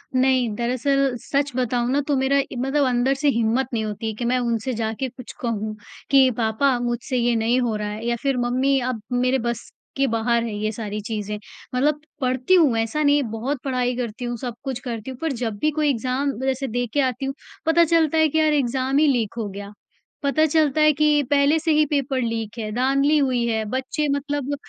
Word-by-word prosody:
नहीं, 255 -2 +3
दरअसल 255 +3 +1
सच 280 0 -1
बताऊँ 245 -1 0
ना 285 +2 +2
तो 290 - +2
मेरा 265 +1 +2
ए, 270 - -3
मतलब 270 +3 +1
अंदर 250 +2 +2
से 295 - +1
हिम्मत 235 +1 +1
नहीं 220 -2 0
होती 215 +1 -4
है 220 - -2
कि 240 - -4
मैं 250 +2 +2
उनसे 235 +1 -1
जाके 225 +3 -2
कुछ 250 0 -11
कहूँ, 215 -3 -2 0.4
कि 270 -2 +6
पापा 240 +4 +2
मुझसे 240 +1 -2
ये 240 0 +2
नहीं 230 +3 +2
हो 235 -3 0
रहा 210 0 -3
है, 215 +2 -6
या 235 - +1
फिर 275 -2 +1
मम्मी 255 +3 +1
अब 230 -4 -4
मेरे 250 +1 +2
बस 235 0 -4 0.3
के 275 - +3
बाहर 230 0 +1
है 230 -2 -4
ये 215 +1 -1
सारी 210 -1 -5
चीज़ें, 210 -2 -3 0.4
मतलब 295 +3 +1 0.2
पढ़ती 255 +5 +1
हूँ 305 -10 +5
ऐसा 225 +7 0
नहीं 290 0 +4
बहुत 250 +5 -3
पढ़ाई 250 -2 0
करती 245 0 -4
हूँ, 240 0 -3
सब 245 +1 -5
कुछ 265 -4 -3
करती 230 +1 -4
हूँ 255 - -9
पर 325 -1 0
जब 225 -4 -2
भी 305 - +2
कोई 305 0 +1
एग्ज़ाम 260 +2 0
जैसे 265 0 -1
दे 245 +1 -1
के 290 - +3
आती 255 0 -1
हूँ, 270 - -2 0.3
पता 325 +1 +5
चलता 325 -1 +2
है 315 0 +5
कि 315 - +1
यार 310 -1 +3
एग्ज़ाम 265 -1 0
ही 305 +1 +5
लीक 240 -7 +1
हो 225 -3 -2
गया। 200 +1 -8 0.5
पता 300 +3 +3
चलता 310 -1 +2
है 305 0 +6
कि 300 0 +3
पहले 285 +2 +4
से 320 +1 0
ही 305 0 +4
पेपर 275 -2 -1
लीक 230 -1 -3
है 215 -1 -3
धाँधली 275 +4 +3
हुई 255 -4 +1
है, 220 -1 0
बच्चे 260 +6 -2
मतलब 285 0 -3
255 Hz, 215 wpm, -23 LUFS, 235-280 Hz, 0.5 s, कि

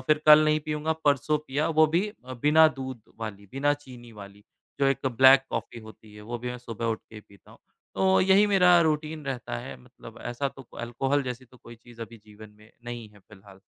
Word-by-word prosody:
फ़िर 150 +3 +1
कल 155 0 +8
नहीं 155 0 +2
पीऊँगा, 150 +1 -2
परसों 145 +1 +2
पिया, 150 +1 -2
वो 155 -1 +4
भी 170 +7 0 0.2
अ, 130 - -9
बिना 160 +2 +6
दूध 130 -6 -8 0.2
वाली, 100 -2 -7
बिना 145 +2 +1
चीनी 125 -5 -14
वाली। 100 0 -13 0.4
जो 135 - +3
एक 135 0 0
ब्लैक 130 +2 +6
कॉफ़ी 115 +1 -5
होती 110 -1 -15
है, 105 - -12
वो 120 +2 -6
भी 125 +1 -5
मैं 125 - -7
सुबह 115 -1 -6
उठ 110 -1 -2
के 110 -1 -11
पीता 100 -1 -21
हूँ। - - -17 0.4
तो 190 0 +3
यही 195 +2 +4
मेरा 180 -3 +5
रूटीन 155 -1 -1
रहता 125 - -4
है - - -8
मतलब - - -14
ऐसा 130 +3 -3
तो 135 - -13 0.2
अल्कोहल 135 +4 -1
जैसी 125 0 -6
तो 125 +1 -21
कोई 120 -1 -14
चीज़ 120 0 -17
अभी 115 +1 -11
जीवन 105 0 -14
में 105 +1 -20
नहीं 120 -2 -7
है 105 - -20
फ़िलहाल। 95 0 -18
130 Hz, 215 wpm, -26 LUFS, 115-150 Hz, 0.4 s, कल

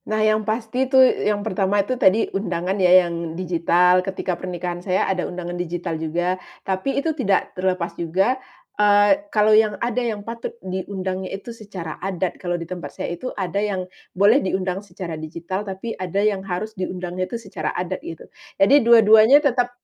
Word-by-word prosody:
Nah, 215 - 0
yang 215 0 +3
pasti 240 +4 -1
itu, 265 - +3
yang 210 -5 +3
pertama 195 -1 0
itu 255 - -1
tadi 225 -4 +3
undangan 180 -2 -2
ya 180 0 +6
yang 170 -1 -5
digital, 180 0 +3
ketika 190 0 -3
pernikahan 175 0 -5
saya 185 0 0
ada 185 -2 -1
undangan 175 -1 -6
digital 175 -1 -4
juga, 175 +3 -1 0.2
tapi 190 +8 -1
itu 315 +3 0
tidak 200 -10 0
terlepas 185 -2 -1
juga, 190 +10 0 0.4
eee, 205 +7 +5
kalau 215 -2 +3
yang 215 -2 +4
ada 245 +1 -1
yang 215 -4 -3
patut 230 0 -6
diundangnya 190 0 -4
itu 235 +4 -9
secara 195 -8 -8
adat, 185 -1 -3
kalau 175 -1 -1
di 170 - -6
tempat 180 +1 -8
saya - - -3
itu 255 +9 -5
ada 200 +1 -1
yang 195 -3 -2 0.3
boleh 210 +8 +5
diundang 190 0 -2
secara 185 -4 -7
digital, 170 +5 -5
tapi 205 +3 -5
ada 185 0 -5
yang 200 -3 +1
harus 195 +3 -4
diundangnya 185 -1 -4
itu 235 - -3
secara 220 -4 -5
adat 180 +1 -3
gitu. 165 - -9 0.3
Jadi 275 +9 +5
dua 230 -1 +6
duanya 220 +5 +7
tetep 250 -4 +1
190 Hz, 175 wpm, -22 LUFS, 180-215 Hz, 0.4 s, duanya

